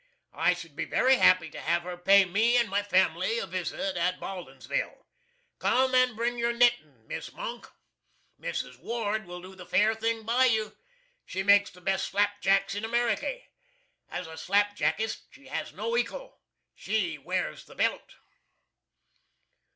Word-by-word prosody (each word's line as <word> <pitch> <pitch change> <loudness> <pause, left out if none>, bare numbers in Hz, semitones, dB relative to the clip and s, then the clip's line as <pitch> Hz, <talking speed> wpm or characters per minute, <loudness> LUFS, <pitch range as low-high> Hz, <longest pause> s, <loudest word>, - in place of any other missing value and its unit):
I 180 - +2
should 165 -4 -11
be - - -2
very 260 +1 +3
happy 170 -8 +4
to - - -8
have 170 +1 0
her 180 0 -5
pay 195 +2 +5
me 220 +7 +3
and 235 -1 +3
my 200 0 0
family 205 - +1
a 485 - -2
visit 195 -1 -3
at 180 +1 0
Baldinsville. 195 - -5 0.5
Come 260 0 +2
and 255 -2 +4
bring 240 +2 -1
your 235 0 +1
knittin', 235 - +1
Miss 160 - -6
MONK. 240 0 -7 0.7
Mrs. - - -4
WARD 220 -3 -2
will 180 0 -8
do 185 +1 -10
the 185 -1 -11
fair 210 +5 +3
thing 225 0 -2
by 240 +4 +3
you. 220 -3 +1 0.5
She 190 - -4
makes 200 0 +5
the 180 - -17
best 195 +1 0
slap 205 +1 0
jacks 195 0 +2
in 205 +2 -4
America. 240 - 0 0.7
As 180 - -5
a 160 0 -10
slap 205 +3 +2
jackist, 195 +8 -1
she - - -16
has - - -4
no 465 - -4
ekal. - - -2 0.4
She 180 -8 -2
wears 135 - -3
the - - -15
Belt. - - -1
205 Hz, 160 wpm, -28 LUFS, 180-235 Hz, 0.7 s, pay